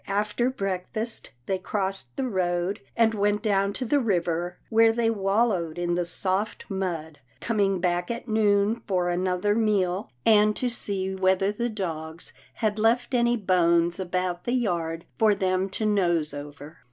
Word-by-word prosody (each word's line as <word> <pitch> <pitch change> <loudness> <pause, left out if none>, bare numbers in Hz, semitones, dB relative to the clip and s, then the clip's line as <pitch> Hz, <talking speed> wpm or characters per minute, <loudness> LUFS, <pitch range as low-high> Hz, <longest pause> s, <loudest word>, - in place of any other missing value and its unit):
After 210 +5 0
breakfast, 200 0 -2 0.2
they 190 -1 -1
crossed 195 0 -3
the 265 -1 -1
road, 185 -1 -1 0.2
and 225 -1 +4
went 205 0 +1
down 200 -2 +2
to 255 - -1
the 285 +5 +2
river, 175 -6 -1
where 225 0 +6
they 225 0 +1
wallowed 195 -5 0
in 175 0 -1
the 175 0 0
soft 190 +4 -2
mud, 170 -6 -4 0.2
coming 195 -1 +1
back 175 0 0
at 235 +1 -4
noon 215 0 +2
for 180 -3 +1
another 180 +3 0
meal, 200 - +1 0.2
and 210 -1 +5
to 250 - -1
see 195 -5 -2
whether 190 +1 +2
the 235 +3 -2
dogs 165 -6 -5 0.2
had 215 -1 -1
left 235 +4 +2
any 240 0 +3
bones 170 -3 +2
about 180 -1 -2
the 240 - 0
yard 170 -8 -1
for 215 -2 +4
them 190 0 0
to 215 +3 -2
nose 175 -7 +1
over. 145 +2 -9
195 Hz, 155 wpm, -26 LUFS, 175-215 Hz, 0.2 s, where